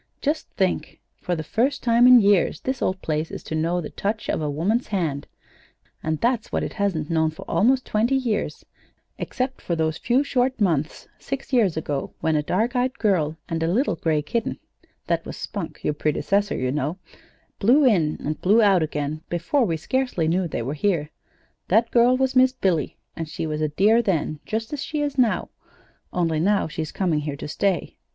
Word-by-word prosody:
"Just 300 +2 -1
think; 190 -2 -1 0.2
for 180 - -2
the 160 - -4
first 245 - 0
time 235 0 +5
in 250 -1 +9
years 200 -4 +3
this 260 0 -3
old 190 0 0
place 155 0 -1
is - - -7
to - - -6
know 165 +3 0
the 160 - -6
touch 210 +2 -3
of - - 0
a 150 - -1
woman's 190 - 0
hand 160 -9 -2 0.7
and 155 -1 -2
that's 240 -2 0
what - - 0
it - - -4
hasn't 180 -7 -1
known 160 -1 +2
for 155 - -9
almost 255 +4 +2
twenty 230 +5 +1
years, 235 -6 -2 0.5
except 260 +1 -3
for 170 - -2
those 160 -1 -1
few 250 +4 +2
short 260 -2 0
months 165 -7 0
six 275 0 -6
years 205 -10 +3
ago 145 -3 -3
when 160 -1 +1
a 150 - +2
dark 220 - 0
eyed 250 +1 0
girl 165 -8 +1
and 165 -2 -3
a 165 - +1
little 235 -1 +1
gray 155 -2 0
kitten 230 +9 -2 0.5
(that - - 0
was - - -8
Spunk, 190 -6 -6
your 150 - +1
predecessor, 195 +8 0
you 130 0 -1
know) 150 +4 -2 0.6
blew 265 +8 +5
in 170 -11 +3
and 150 +1 -3
blew 205 +5 +4
out 200 -5 +5
again 150 0 -2
before 180 - +1
we 165 -5 -1
scarcely 250 -3 -1
knew 175 +2 +1
they 130 - -3
were 135 +5 -3
here. 155 -2 0 0.6
That 225 +4 +3
girl 245 +1 +5
was 265 0 0
Miss 255 0 +5
Billy, 180 - 0 0.2
and 165 -2 -5
she 160 - -4
was 155 -1 -3
a 155 - +2
dear 210 +9 +4
then, 160 -7 -1
just 225 +4 -3
as 290 - -3
she 305 -2 -3
is 285 -2 -2
now, 235 -4 +2 0.6
only 165 -3 0
now 200 +3 +2
she's 155 0 -5
coming 175 -6 0
here 150 -1 -4
to 140 - -7
stay. 185 +3 -1
185 Hz, 195 wpm, -23 LUFS, 155-235 Hz, 0.7 s, in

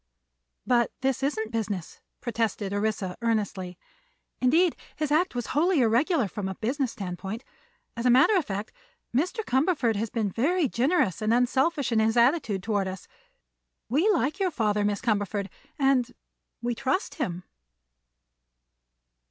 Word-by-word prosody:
"But 240 -2 +2
this 265 0 0
isn't 250 -6 -1
business," 210 -6 -4 0.2
protested 225 -4 -2
Orissa, 205 -3 -1
earnestly; 200 -6 -1 0.6
"indeed, 320 +7 +4 0.2
his 305 -2 -2
act 335 0 +2
was 245 -2 -2
wholly 325 +2 +3
irregular 245 - +2
from 195 +1 -4
a 190 - -5
business 255 +4 -1
standpoint. 195 +4 -5 0.5
As 235 +1 -1
a - - +5
matter 260 - +6
of 365 - +3
fact, 205 -3 -5 0.4
Mr. 365 - 0
Cumberford 265 - +2
has 225 +2 -2
been 215 -3 -1
very 305 - +1
generous 260 - +1
and 215 +1 +1
unselfish 260 +4 +2
in 225 - +3
his 220 +2 +2
attitude 235 - +2
toward 205 -2 0
us. 185 -1 -7 0.8
We 310 - +3
like 325 - +1
your 385 -2 +2
father, 210 -8 0
Miss 205 0 0
Cumberford, 205 -3 -1 0.3
and—we 250 -2 -2
trust 270 - -1
him." 180 -8 -2
235 Hz, 135 wpm, -27 LUFS, 210-280 Hz, 0.8 s, matter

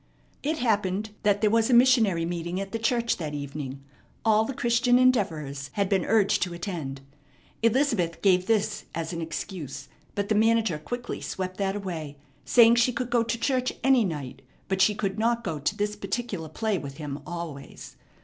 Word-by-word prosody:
It 310 +2 -1
happened 210 -4 0
that 205 -1 +2
there 210 -1 +3
was 225 +1 +3
a 245 - +5
missionary 230 -9 +4
meeting 170 +1 -3
at 195 0 -5
the 225 - -2
church 235 0 +1
that 150 -4 -4
evening. 140 -1 -6 0.4
All 220 0 +4
the 275 - -3
Christian 245 0 +3
Endeavorers 160 - +1
had 200 -2 0
been 190 -4 +1
urged 210 -2 +3
to 175 -2 -1
attend. 165 -7 -5 0.6
Elizabeth 230 - +1
gave 185 -2 +4
this 220 -2 0
as 165 +1 -3
an 170 - -4
excuse; 160 -3 -6 0.3
but 200 0 -1
the 215 - +1
manager 220 -6 +2
quickly 245 +10 -5
swept 185 -1 -4
that 195 -1 -1
away, 165 -8 -5 0.3
saying 235 -1 +6
she 240 +1 +4
could 245 0 -3
go 240 -1 +4
to 230 +1 -1
church 255 +1 0
any 265 -2 +5
night, 150 -9 -5 0.3
but 190 0 0
she 210 +2 +4
could 195 0 -2
not 235 +1 +1
go 160 -7 -3
to 150 +9 -1
this 210 0 -1
particular 210 -6 -4
play 215 +3 -1
with 140 -2 -8
him 145 -2 -5
always. 170 -5 -7
200 Hz, 180 wpm, -26 LUFS, 165-230 Hz, 0.6 s, saying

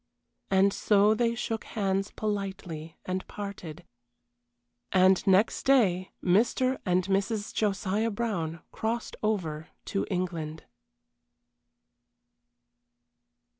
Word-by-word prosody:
And 195 +1 +4
so 210 0 +4
they 230 +1 +1
shook 225 -1 -3
hands 195 -2 -1
politely 190 -6 -4
and 185 0 -1
parted. 180 -5 -7 1.1
And 185 0 +5
next 195 +3 +4
day 195 -9 +3
Mr. 240 +7 +2
and 180 0 +3
Mrs. 200 +2 -1
Josiah 210 +1 0
Brown 190 -8 -2
crossed 225 +1 -3
over 165 -8 -1 0.2
to 195 - -2
England. 170 -4 -3
195 Hz, 90 wpm, -28 LUFS, 180-215 Hz, 1.1 s, And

